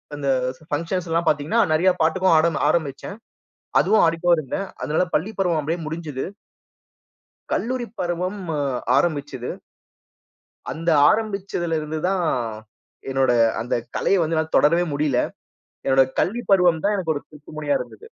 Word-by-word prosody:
அந்த 140 -1 -2 0.4
பங்க்ஷன்ஸ்லாம் 165 +1 -1
பாத்தீங்கன்னா, 150 +11 +2
நெறையா 175 +4 +4
பாட்டுக்கும் 170 +3 +3
ஆட 160 +2 +4 0.2
ஆரம்பிச்சேன். 155 +4 -1 0.6
அதுவும் 220 - +4
ஆடிட்டு 165 +1 -1
தான் 170 - +6
இருந்தேன். 155 +7 -3 0.2
அதனால 155 +4 +1
பள்ளி 185 +8 +1
பருவம் 175 -4 +1
அப்பிடியே 160 +4 -2
முடிஞ்சுது. 155 -4 -4 1.3
கல்லூரி 245 0 -1
பருவம் 180 +3 -2 0.2
அ - - 0 0.4
ஆரம்பிச்சிது. 145 -6 -1 1.2
அந்த 165 +2 -2 0.2
ஆரம்பிச்சிதுல 195 -6 -1
இருந்து 155 +1 -4
தான், 190 -3 0 0.8
என்னோட 135 -1 +2 0.3
அந்த 120 - -3 0.2
கலைய 195 -2 +2
வந்து 160 +1 -1
என்னால 160 0 -1
தொடரவே 170 +4 +4
முடியல. 140 -3 +1 0.7
என்னோட 135 0 +5 0.2
கல்லூரி 235 +6 0
பருவம் 180 -4 +4
தான் 205 - +2
எனக்கு 170 -5 -1
ஒரு 145 - -4
திருப்புமுனையா 150 -1 -3
இருந்தது. 445 - -9
165 Hz, 130 wpm, -22 LUFS, 150-185 Hz, 1.3 s, தான்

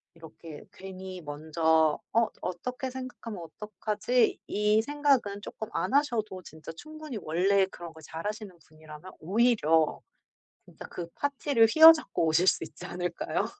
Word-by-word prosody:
이렇게 160 -1 -12
괜히 190 -1 -9
먼저 160 +1 +1
'어 230 0 +3
어떻게 250 +9 -4
생각하면 250 -6 -8
어떡하지.' 215 +6 -1
이 210 +1 +2
생각은 275 -7 0
쪼끔 220 - -7
안 185 +8 -2
하셔도 230 -9 0
진짜 160 -2 -11
충분히 310 - -8
원래 190 +5 +2
그런 170 -3 -10
거 160 - -14
잘하시는 200 +5 -6
분이라면 155 +3 -13
오히려 175 -5 +2 0.6
진짜 - - -13
그 170 - -6
파티를 280 -4 +2
휘어잡고 320 - +7
오실 160 +3 +2
수 - - +3
있지 - - -12
않을까요? 175 -1 -3
195 Hz, 305 characters per minute, -28 LUFS, 165-240 Hz, 0.6 s, 휘어잡고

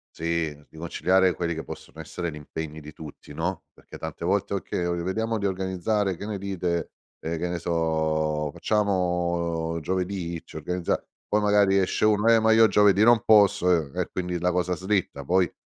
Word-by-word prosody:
sì, 85 -2 -1
di - - -16
conciliare 90 +3 +2
quelli 85 -1 -2
che 80 - -5
possono - - -10
essere 85 -1 -4
l'impegni 75 0 -7
di 75 0 -11
tutti, 75 -1 -11
no, 90 +5 -3
perché - - -13
tante 80 0 -7
volte: 100 +3 0
"Okay, 100 - -3
ehm, 85 0 -1
vediamo 110 +5 -1
di 100 - -2
organizzare, 95 +1 -1
che 100 - -7
ne 105 -1 -3
dite?" 90 -4 -2 0.3
Ehm, 80 +1 -3
che 90 +1 -2
ne 85 0 -3
so, 80 -2 0
"Facciamo 85 -5 0
giovedì? 90 0 -3
Ci - - -15
organizza" 90 +3 -2 0.2
poi 105 - +1
magari 105 -1 +4
esce 95 +2 +1
uno: 105 +1 +3
"Eh, 115 - +6
ma 110 0 +3
io 110 0 +7
giovedì 105 0 +4
non 120 -1 +5
posso." 100 -4 +5
Ehm, 80 -6 0
e - - 0
quindi 90 -1 -3
la 90 +1 +1
cosa 90 0 0
slitta. 95 -7 -2
Poi 90 +2 +2
90 Hz, 180 wpm, -25 LUFS, 80-100 Hz, 0.3 s, io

